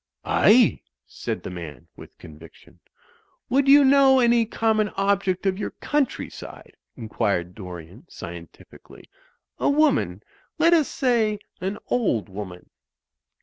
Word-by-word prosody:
"Aye," - - +4 0.2
said - - -6
the - - -6
man, 80 -7 -9
with - - -14
conviction. 80 +1 -16 0.7
"Would 275 +2 +2
you 280 +1 +7
know 270 -1 +5
any 235 -2 +3
common 220 -2 0
object 195 -1 0
of 190 0 0
your 205 - -3
countryside," 295 -2 -4 0.2
inquired 105 -6 -2
Dorian, 90 - -11
scientifically, 85 0 -12 0.5
"a - - +1
woman 270 - +1 0.2
— - - -38
let 335 +2 +4
us 315 -4 +3
say 230 -5 0 0.2
an 195 +3 -4
old 120 - -1
woman." 95 -2 -9
195 Hz, 120 wpm, -23 LUFS, -, 0.7 s, you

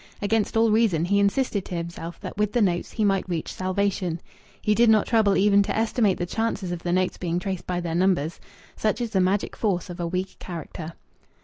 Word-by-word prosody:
Against 215 +1 0
all 225 -1 +4
reason 210 -7 +3
he 200 +3 +2
insisted 200 0 +1
to 180 - -5
himself 170 0 -6
that - - -6
with 210 0 0
the 240 - +2
notes 175 -3 -1
he 220 - +1
might 195 -2 +1
reach 165 -3 -3
salvation. 185 -2 -1 0.4
He 210 - +2
did 230 +2 +4
not 215 -2 +5
trouble 215 -4 +3
even 200 0 +5
to 200 - -1
estimate 220 -3 +2
the 175 - -2
chances 210 -2 -2
of 175 -1 -4
the 175 - -2
notes 185 +1 0
being 175 -1 -1
traced 190 -1 -4
by 180 -1 -1
their 170 -1 -3
numbers. 175 -3 +1 0.4
Such 215 +2 0
is 235 -2 -3
the 190 - +2
magic 190 +3 0
force 185 -4 -1
of 175 - -9
a 170 - -1
weak 185 +2 -3
character. 165 -1 -7
190 Hz, 215 wpm, -25 LUFS, 175-210 Hz, 0.4 s, not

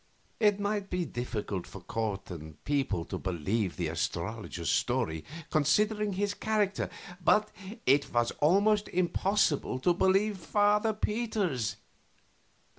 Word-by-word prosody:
It 205 -2 +4
might 205 -1 -1
be 180 -1 -1
difficult 110 - -4
for 100 - -9
court 100 0 -3
and 80 -2 -9
people 135 - 0
to - - -5
believe 95 +3 -1
the 85 - -1
astrologer's 85 +3 -3
story, 80 -1 0 0.3
considering 210 +7 +2
his 205 +2 0
character, 210 -2 0 0.3
but 210 +5 +4 0.3
it 140 +1 +3
was 120 -1 +2
almost 205 +6 +4
impossible 180 -5 +1
to 175 - +4
believe 195 +3 +2
Father 210 +5 +2
Peter's. 210 - -1
170 Hz, 115 wpm, -30 LUFS, -, 0.3 s, It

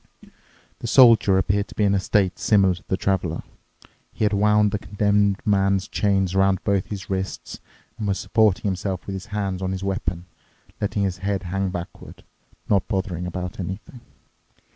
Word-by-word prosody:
The - - -5
Soldier 115 -6 +6
appeared 100 +2 +1
to - - -14
be 105 - +1
in 100 -1 +3
a 100 - +2
state 95 -1 +1
similar 100 -3 +3
to 90 - -12
the 95 - 0
Traveler. 90 -5 -1 0.7
He 110 - -1
had 105 - +1
wound 105 0 +3
the 105 - -2
Condemned 100 -1 +1
Man's 100 -1 +2
chain 100 -2 +1
around 95 -1 +2
both 100 -2 0
his 100 -3 -6
wrists 95 0 -4 0.4
and 105 - -2
was 100 -1 0
supporting 110 -4 +2
himself 95 -1 -2
with 100 - -5
his 95 +2 -6
hand 100 -3 -3
on 95 0 -2
his 95 0 -5
weapon, 90 -3 -3 0.6
letting 105 0 -1
his 95 -2 -2
head 100 0 -2
hang 95 +2 -2
backward, 90 -2 -8 0.4
not 100 -3 +2
bothering 95 -4 -2
about 90 +1 -5
anything. 105 - -7
100 Hz, 170 wpm, -23 LUFS, 95-105 Hz, 0.7 s, Soldier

